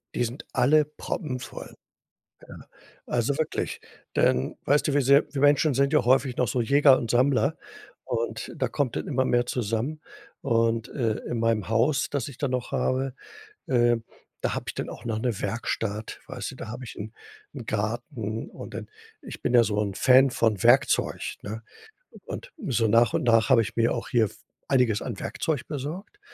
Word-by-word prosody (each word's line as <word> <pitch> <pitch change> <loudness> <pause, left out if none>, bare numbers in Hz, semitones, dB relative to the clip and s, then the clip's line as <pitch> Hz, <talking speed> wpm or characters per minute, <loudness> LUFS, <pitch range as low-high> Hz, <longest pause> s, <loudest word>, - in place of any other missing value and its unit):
Die - - +1
sind 120 +3 -5
alle 150 +4 +4
proppenvoll. 140 -3 -6 0.7
Ja, - - -12 0.4
also, 120 +3 0
wirklich, 160 0 -2 0.3
denn, 65 +2 +2
weißt 145 +2 +3
du, 145 - 0
wie 145 - +3
sehr 140 +3 +5
Wir 135 - -2
Menschen 145 +1 +4
sind 140 +2 +2
ja 150 - +3
häufig 130 0 +3
noch 125 - +2
so 125 - 0
Jäger 140 +2 +5
und 115 - -4
Sammler 135 +4 +2 0.5
und 115 -1 -3
da 130 - 0
kommt 130 0 -1
dann - - -3
immer 130 -1 +1
mehr 120 -1 +2
zusammen. 125 +7 -2 0.4
Und, 115 -3 +1
äh, 115 -5 -1
in 120 - -2
meinem 115 -4 +1
Haus, 115 +6 +2
das 140 -3 -2
ich 140 - -10
dann 140 -3 -1
noch 125 -1 -2
habe, 130 0 0 0.5
äh, 120 -2 +3 0.4
da - - -1
habe - - -4
ich - - -3
dann - - -4
auch 115 - -10
noch 110 -2 -2
'ne 115 -4 -2
Werkstatt, 110 0 -3
weißt - - -5
du? - - -11
Da - - -8
habe 120 +3 -7
ich - - -9
'n 110 +2 -7 0.4
'n 125 -6 -8
Garten 110 +1 -3
und - - -10
dann - - -7 0.3
ich - - -9
bin - - -1
ja 120 -1 +7
so 105 -2 -1
'n 100 -2 -2
Fan 130 +5 +5
von 110 -6 +1
Werkzeug, - - +3
ne? 110 +2 -6 0.6
Und - - -7 0.2
so 115 -4 +2
nach 115 +1 +4
und - - 0
nach 115 -2 +4
habe 115 - +6
ich 110 0 -5
mir 115 0 +2
auch - - -4
hier 115 -2 +3
f 100 - -9 0.3
einiges 125 -6 +2
an 115 -6 -5
Werkzeug 155 -6 -2
besorgt. 155 - -6
120 Hz, 185 wpm, -26 LUFS, 115-140 Hz, 0.7 s, ja